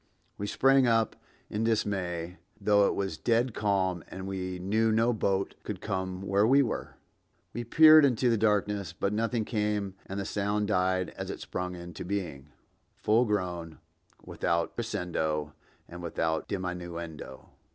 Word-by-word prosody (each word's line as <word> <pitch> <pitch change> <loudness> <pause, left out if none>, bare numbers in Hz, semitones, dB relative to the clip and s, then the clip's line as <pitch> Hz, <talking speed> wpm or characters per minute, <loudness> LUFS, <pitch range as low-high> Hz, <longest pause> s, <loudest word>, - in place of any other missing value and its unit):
We 100 - -4
sprang 135 +3 +4
up 115 -2 +2 0.3
in 105 +1 -2
dismay, 90 -6 -1 0.2
though 100 0 +4
it - - -1
was 95 -5 -3
dead 120 +4 +1
calm 95 -5 0
and 95 0 -7
we 95 -1 -4
knew 110 +5 +1
no 115 +2 +3
boat 100 -3 0
could - - -5
come 95 0 -3
where 100 +2 +2
we 140 +3 +6
were. 115 - -4 0.6
We 120 - -4
peered 155 +5 +8
into 130 -2 +3
the 115 - +4
darkness, 105 -4 +1
but 100 +3 -1
nothing 115 +1 0
came 105 -3 -1
and 95 +1 -4
the 100 - -3
sound 105 0 -1
died 95 -2 +1
as - - -6
it - - -5
sprung 90 0 -4
into 85 -1 -8
being, 85 -7 -4 0.5
full 115 +3 +3
grown, 90 -6 -2 0.5
without 85 0 -1
crescendo 80 -9 -2 0.3
and 85 +1 -9
without 80 -1 -1
diminuendo. 85 -7 -6
100 Hz, 150 wpm, -29 LUFS, 90-110 Hz, 0.6 s, peered